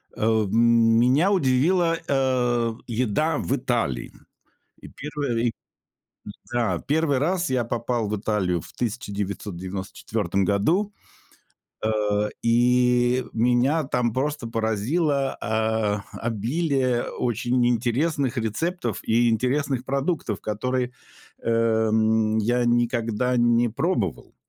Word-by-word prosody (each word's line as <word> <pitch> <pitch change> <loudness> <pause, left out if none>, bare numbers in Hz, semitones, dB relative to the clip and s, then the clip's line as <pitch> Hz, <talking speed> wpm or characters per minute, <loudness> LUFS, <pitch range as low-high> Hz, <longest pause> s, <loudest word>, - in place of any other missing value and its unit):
Э, - - -8 0.2
м, 115 +2 +4
меня 140 +11 +3
удивила, 165 +2 +2
э, 125 -4 +1
еда 125 +6 0
в 135 - -1
Италии. 115 - -2 0.7
И - - -10
первое 140 -5 -3
и 120 - +2 1.0
да. 115 -8 0
1 145 -2 +1
раз 175 +5 0
я 130 -2 +1
попал 115 -1 -2
в 105 - -1
Италию 95 -5 0
в - - -14
1994 100 -3 -3
году, 160 - +1 0.9
э, 110 - +1 0.5
и 125 +1 +3
меня 125 +7 +2
там 125 -4 -1
просто 145 -1 -2
поразило, 130 - 0
а, 110 -2 0
обилие 125 +3 -1
очень 120 +1 0
интересных 125 +3 0
рецептов 120 - -2
и 120 +1 +3
интересных 130 +3 0
продуктов, 140 +4 -2
которые, 125 +4 -2 0.5
эм, 110 -1 +2
я 120 +3 +1
никогда 120 0 +1
не 120 0 +3
пробовал. 110 - -2
120 Hz, 100 wpm, -24 LUFS, 110-135 Hz, 1.0 s, м